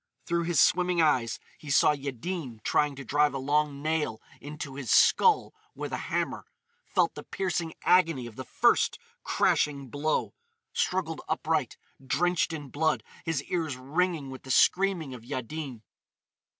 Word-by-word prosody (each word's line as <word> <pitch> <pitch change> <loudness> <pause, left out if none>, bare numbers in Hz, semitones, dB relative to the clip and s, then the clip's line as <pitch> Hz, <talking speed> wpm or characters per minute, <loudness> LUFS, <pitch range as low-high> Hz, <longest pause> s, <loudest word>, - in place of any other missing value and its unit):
Through 170 -1 0
his 170 -4 +1
swimming 180 -1 +3
eyes 125 -7 +2 0.2
he 150 - -10
saw 140 - +5
Yaddin 140 - -5
trying 150 -1 +2
to 140 0 -8
drive 145 +3 +2
a - - 0
long 145 +1 0
nail 155 -8 -1 0.2
into 145 -1 -7
his 135 -3 -6
skull 450 -4 +5 0.2
with - - -5
a - - 0
hammer,—felt 470 +1 -2
the - - -8
piercing 175 -4 -3
agony 165 -8 +3
of 115 -2 -10
the 130 - -6
first - - +2 0.3
crashing 140 -3 +1
blow,—struggled 180 - -2
upright, - - -1 0.3
drenched 175 +6 +1
in 150 -4 -6
blood, 160 +4 0 0.2
his 160 -4 -1
ears 160 -7 -2
ringing 150 +2 -1
with 130 - -9
the 130 - -13
screaming 180 0 +3
of 120 -3 -10
Yaddin. 130 -1 -5
150 Hz, 140 wpm, -28 LUFS, 135-170 Hz, 0.3 s, saw